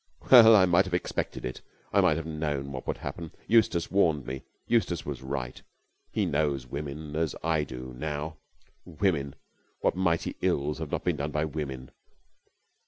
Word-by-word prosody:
"Well, 115 -3 +10
I 95 -3 +7
might 90 +2 +4
have 95 -2 -2
expected 90 - -3
it, 65 - -5 0.3
I - - +5
might 75 - +3
have 80 - -4
known 75 -3 -3
what 65 -2 -7
would - - -1
happen! 85 -2 -6 0.2
Eustace 110 -7 +3
warned 80 -8 +2
me. 65 +1 -5 0.2
Eustace 110 -7 +1
was - - -5
right. 65 -2 -4 0.5
He - - 0
knows 70 -3 0
women 75 +3 -6
as 80 -1 0
I 80 -2 +1
do 65 -2 -8
now. 75 +3 -4 0.5
Women! 75 -5 -1 0.5
What - - +2
mighty 85 -3 0
ills 75 +1 0
have - - -4
not - - -2
been 90 -4 0
done 70 +1 -2
by 75 +1 0
women? 70 -4 -5
75 Hz, 170 wpm, -28 LUFS, 70-85 Hz, 0.5 s, Well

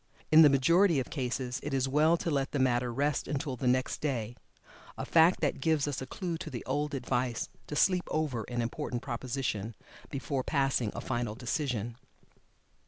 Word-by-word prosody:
In 155 +1 +9
the 150 - +9
majority 165 +5 +4
of 130 - -4
cases 125 -2 -2
it 145 -1 -3
is 135 0 +1
well 155 +5 +3
to 165 - -2
let 135 -2 -1
the - - 0
matter 125 -2 +1
rest 140 +4 0
until 140 -1 -2
the 125 +1 -2
next 130 +1 +1
day 120 -6 -2 0.6
a - - -4
fact 165 +2 +4
that 145 -4 0
gives 150 0 +1
us 145 - -3
a 130 - -5
clue 170 +2 -4
to 165 - -6
the 125 -5 -6
old 145 +3 -1
advice 125 -2 -1 0.2
to 150 - -5
"sleep 180 +3 +3
over" 145 -8 -1
an 120 -1 -2
important 120 +1 -4
proposition, 120 -3 -3 0.3
before 135 -1 -2
passing 135 -7 +1
a - - -4
final 120 -3 -2
decision. 120 -2 -2
135 Hz, 180 wpm, -30 LUFS, 125-150 Hz, 0.6 s, In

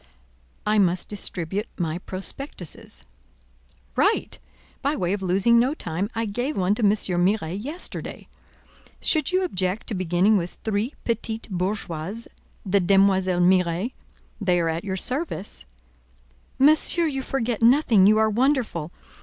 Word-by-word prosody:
"I 210 0 +3
must 180 -2 +2
distribute 195 0 -3
my 165 -1 -2
prospectuses." 185 - -6 0.9
"Right! - - +1 0.4
By 285 +3 0
way 180 -4 -1
of 200 - -3
losing 195 +6 +3
no 260 +5 +2
time, 180 - -2
I 230 0 -1
gave 245 +8 -3
one 190 +1 +2
to 215 - -3
M. 205 - +5
Miret 190 -1 0
yesterday. 310 +7 -5 0.7
Should 310 0 +1
you 370 +1 +2
object 185 - -1
to - - -4
beginning 185 +3 +2
with 175 -1 -4
three 220 +5 -1
petite 225 -1 -2
bourgeoises, 185 +2 -3 0.4
the 200 +1 +2
Demoiselles 190 -1 +3
Miret? 180 +4 +2 0.5
They 180 -3 +2
are 165 -1 +1
at 165 +1 -2
your 190 -2 -3
service." 255 - -2 0.9
"Monsieur, 310 +4 +4
you 275 -4 -2
forget 240 -4 -2
nothing; 230 -5 +5
you 215 +1 +5
are 220 0 +4
wonderful. 225 - 0
200 Hz, 135 wpm, -24 LUFS, 180-235 Hz, 0.9 s, M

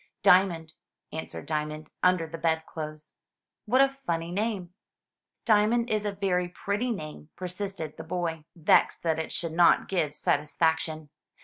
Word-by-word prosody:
''Diamond,'' 180 -4 +4 0.4
answered 160 - -6
Diamond, 155 0 -3
under 180 -2 +3
the 165 +1 -8
bedclothes. 160 -2 -3 0.5
"What 255 +5 +4
a 275 - +7
funny 170 -12 -4
name!" 195 -3 -2 0.7
"Diamond 225 +2 +3
is 215 -1 0
a 205 - 0
very 190 -3 0
pretty 200 +7 -2
name," 155 -7 -6
persisted 180 -3 -5
the 160 - -6
boy, 165 -2 -3
vexed 165 -3 +3
that 160 -1 +1
it 160 - -3
should 165 -2 -3
not 170 +1 +5
give 155 -6 -1
satisfaction. 155 +1 0
170 Hz, 135 wpm, -28 LUFS, 160-200 Hz, 0.7 s, a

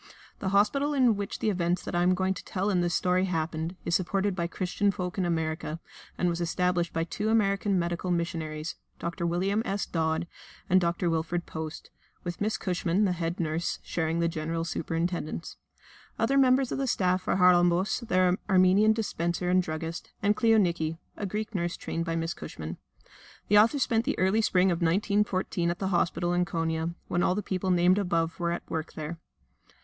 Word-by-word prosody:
The 190 - -1
hospital 275 +9 +2
in 250 -5 +4
which 200 0 -4
the 215 - 0
events 175 -1 0
that - - -6
I 175 - +2
am 180 +1 +4
going 190 +1 +1
to - - -9
tell 195 +2 -1
in 180 -2 +2
this 175 -1 0
story 185 +1 +2
happened 165 -1 -2
is 170 - -1
supported 195 +2 +1
by 170 -2 -1
Christian 185 +4 -1
folk 180 -1 -3
in 185 - +1
America, 160 -1 -2 0.4
and 180 - +1
was 170 0 -1
established 175 0 0
by 165 - -1
two 210 +6 -2
American 200 -2 +2
medical 175 +1 -2
missionaries, 165 -2 -2 0.2
Dr. 170 0 -3
William 190 +5 +1
S. 200 -2 -2
Dodd, 160 0 -1 0.4
and 185 +1 +4
Dr. 170 +1 0
Wilfred 165 +1 -1
Post, 160 0 -7 0.3
with 175 +2 -5
Miss 215 +1 0
Cushman, 180 +1 0
the 190 - +2
head 170 -1 -3
nurse, 165 0 -1
sharing 165 -1 -1
the 170 0 +2
general 165 0 -2
superintendence: 165 0 -3 0.6
other 240 +5 +1
members 260 -1 +4
of - - -2
the 270 - 0
staff 185 -4 +1
are - - +2
Haralambos, 180 +1 +4
their 185 -2 +3
Armenian 190 +3 +5
dispenser 180 -5 -1
and 185 0 +4
druggist, 165 0 -5
and 205 +1 +3
Kleoniki, 175 -9 +2 0.2
a 205 - -4
Greek 215 +3 -4
nurse 175 -2 -2
trained 165 0 -3
by 165 0 -2
Miss 165 0 -1
Cushman. 80 +1 -7 0.7
The 205 +1 +7
author 230 +7 +4
spent 230 -4 +1
the 290 - -1
early 190 +4 +3
spring 185 -3 +3
of 170 - -1
1914 185 0 +1
at 170 - -2
the 190 0 -2
hospital 175 -1 +1
in 175 0 +2
Konia, 165 0 -2
when 175 - 0
all 180 - +2
the 210 - -2
people 190 0 -2
named 180 +2 +4
above 170 -4 0
were 170 -1 0
at 170 - -4
work 160 -1 -4
there. 160 +2 -6
180 Hz, 185 wpm, -28 LUFS, 170-195 Hz, 0.7 s, The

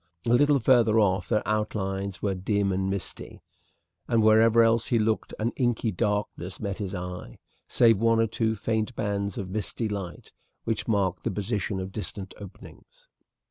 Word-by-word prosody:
A 115 - +2
little 145 +3 +5
further 115 -2 +4
off 95 -3 +1
their 105 -2 0
outlines 100 -3 -2
were 100 -2 +1
dim 100 +1 0
and 95 +1 -1
misty; 95 -2 -5 0.6
and 115 -2 +2
wherever 110 +1 +6
else 115 0 +2
he 120 - +2
looked 110 0 0
an 115 +2 -1
inky 120 -3 0
darkness 105 -3 -2
met 100 -2 -4
his 100 -2 -4
eye, 90 0 -7 0.3
save 115 -4 +4
one 115 0 +3
or 115 - +4
two 110 0 -1
faint 110 +2 -2
bands 100 -2 -2
of 95 -2 -5
misty 110 +2 -3
light, 100 -4 -6 0.3
which 115 - -2
marked 100 -5 0
the - - 0
position 105 0 -2
of 95 0 -5
distant 100 -1 -6
openings. - - -14
105 Hz, 165 wpm, -26 LUFS, 95-115 Hz, 0.6 s, wherever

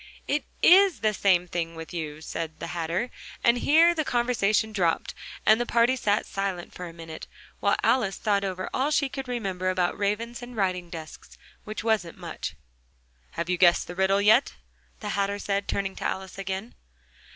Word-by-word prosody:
"It 295 +1 0 0.2
is 380 -1 +6
the 215 -1 +2
same 185 -3 +3
thing 165 -1 -3
with 160 +1 -8
you," 155 -3 -5
said 160 0 -5
the 170 +1 -5
Hatter, 170 +8 -2 0.3
and 235 +1 +4
here 330 +6 +5
the 315 -2 -1
conversation 230 -4 +1
dropped, 175 -5 0 0.3
and 220 +2 +5
the - - 0
party 235 +2 +3
sat 210 -4 +1
silent 195 -3 -4
for 180 - -7
a - - -8
minute, 165 -1 -9 0.3
while - - +2
Alice 215 -7 +2
thought 200 -2 +1
over 185 -1 -3
all 270 +3 +1
she 290 -2 +2
could 265 0 -6
remember 195 -7 -2
about 180 -1 +1
ravens 225 +4 -2
and 245 -1 -9
writing 180 -3 -1
desks, 160 -2 -10 0.3
which 215 0 -5
wasn't 215 -7 0
much. 170 - -6 0.8
"Have 170 - -3
you 180 -1 0
guessed 175 -2 +5
the 175 - -7
riddle 190 +2 +2
yet?" 220 +6 +4 0.5
the 210 - -4
Hatter 200 0 0
said, 200 0 -2
turning 195 -1 -2
to - - -6
Alice 190 0 -4
again. 195 +4 -4
195 Hz, 180 wpm, -26 LUFS, 175-235 Hz, 0.8 s, is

